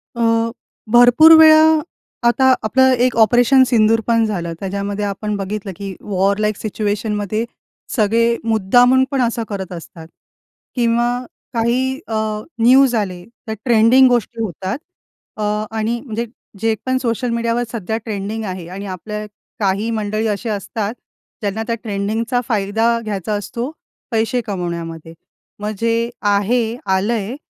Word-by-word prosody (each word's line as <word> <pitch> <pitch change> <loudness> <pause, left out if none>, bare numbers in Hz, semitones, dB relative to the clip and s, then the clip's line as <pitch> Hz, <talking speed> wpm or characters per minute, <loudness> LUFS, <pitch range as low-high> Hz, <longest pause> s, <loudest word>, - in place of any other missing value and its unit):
अ, 230 0 +1 0.4
भरपूर 245 +7 +7
वेळा 315 0 +8 0.6
आता 260 +2 +4
आपलं 260 +4 +4
एक 255 - 0
ऑपरेशन 245 +4 +5
सिंदूर 225 -1 +3
पण 230 -1 +3
झालं, 175 -6 -3
त्याच्यामध्ये 200 +1 -3
आपण 205 +1 -3
बघितलं 200 0 -4
की 195 -2 -6
वॉर 200 0 0
लाईक 210 -1 0
सिच्युएशन 210 0 -2
मध्ये 210 +2 -2 0.5
सगळे 230 +1 +2
मुद्दामून 245 +4 +4
पण 275 -2 +1
असं 235 -1 0
करत 190 -3 -5
असतात 165 -1 -10 0.7
किंवा 235 -1 +2 0.4
काही 255 +4 0
अ, 225 - -5 0.5
न्यूज 255 +1 +5
आले, 185 -5 -2 0.2
त्या 220 -1 -4
ट्रेंडिंग 240 +2 +5
गोष्टी 235 -1 -1
होतात. 190 - -4 0.6
अ, 215 - -3 0.3
आणि 230 +2 -1
म्हणजे 230 0 -3 0.3
जे 225 +1 +1
पण 260 0 +1
सोशल 245 0 -1
मीडियावर 235 +1 0
सध्या 220 -1 -3
ट्रेंडिंग 215 +1 -4
आहे 185 -3 -6
आणि 195 +2 -7
आपल्या 210 +3 -6 0.3
काही 200 +2 0
मंडळी 215 0 -1
असे 210 +2 -2
असतात 210 +1 -3 0.5
ज्यांना 210 +2 -2
त्या 230 - 0
ट्रेंडिंगचा 220 +4 -1
फायदा 225 +2 +1
घ्यायचा 210 -2 -3
असतो 235 +6 -4 0.4
पैसे 225 +2 0
कमवण्यामध्ये. 170 -5 -5 0.5
मग 210 +1 -3
जे 230 0 0
आहे, 220 +3 +1
आलंय, 205 +4 0
220 Hz, 135 wpm, -18 LUFS, 200-235 Hz, 0.7 s, वेळा